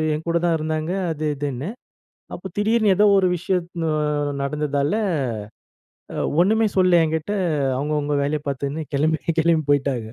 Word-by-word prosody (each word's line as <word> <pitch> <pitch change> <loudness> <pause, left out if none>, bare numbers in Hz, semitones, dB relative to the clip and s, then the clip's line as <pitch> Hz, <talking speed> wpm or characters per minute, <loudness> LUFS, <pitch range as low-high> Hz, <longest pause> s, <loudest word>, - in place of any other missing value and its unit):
எங்கூட 165 +2 -1
தான் 170 -1 +3
இருந்தாங்க 155 +1 -2 0.2
அது, 155 0 -3
இதுன்னு. 140 +2 -4 0.7
அப்போ 180 - -8
திடீர்னு 215 -1 +3
ஏதோ 210 - +4
ஒரு 190 -1 +4
விஷயத் 180 0 -1 0.2
அ - - +1 0.5
நடந்ததால 145 0 -1 1.2
அ - - -5 0.2
ஒண்ணுமே 220 +5 +3
சொல்லல 180 -2 +5
எங்கிட்ட, 160 +4 -2 0.4
அவுங்கவுங்க 150 +1 -1
வேலய 145 +2 -1
பார்த்துன்னு 140 +3 -3
கெளம்பி, 155 +3 +1 0.2
கெளம்பி 160 -1 +2
போயிட்டாக 135 -6 0
155 Hz, 130 wpm, -22 LUFS, 145-175 Hz, 1.2 s, சொல்லல